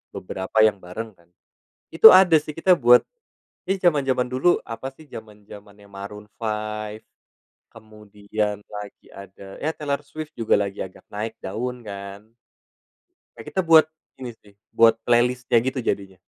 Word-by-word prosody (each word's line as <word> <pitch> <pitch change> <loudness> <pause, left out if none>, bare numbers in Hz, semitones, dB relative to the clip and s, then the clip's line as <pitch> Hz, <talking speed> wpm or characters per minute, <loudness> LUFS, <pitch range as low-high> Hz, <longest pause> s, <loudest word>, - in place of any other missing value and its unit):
beberapa 95 +3 -3
yang 105 -2 +2
bareng 110 +6 -7
kan, 85 0 -27 0.6
itu 165 +7 +10
ada 185 -3 +6
sih 150 +1 -8
kita 180 +3 +4
buat 125 -1 +6 0.7
di 195 0 0
zaman-zaman 135 -7 +1
dulu 130 +8 +2
apa 115 +3 -6
sih 155 - -16
zaman-zamannya 105 -2 -13
Maroon 100 +1 -9
5, 110 -1 -4 0.7
kemudian 105 -1 -5
lagi 105 -1 -9
ada, 100 0 -12
ya 150 - -1
Taylor 140 -2 -2
Swift 155 +2 -8
juga 115 -2 +1
lagi 100 -1 -3
agak 95 - -14
naik 110 +2 -4
daun 120 +5 -5
kan. 100 0 -8 1.1
Ya, - - -9
kita 190 - -1
buat 160 -1 +7 0.3
ini 125 -2 -6
sih, 105 - -21 0.2
buat 115 0 +5
playlist-nya 120 0 +2
gitu 130 +1 -2
jadinya. 100 -4 -3
110 Hz, 140 wpm, -23 LUFS, 100-130 Hz, 1.1 s, itu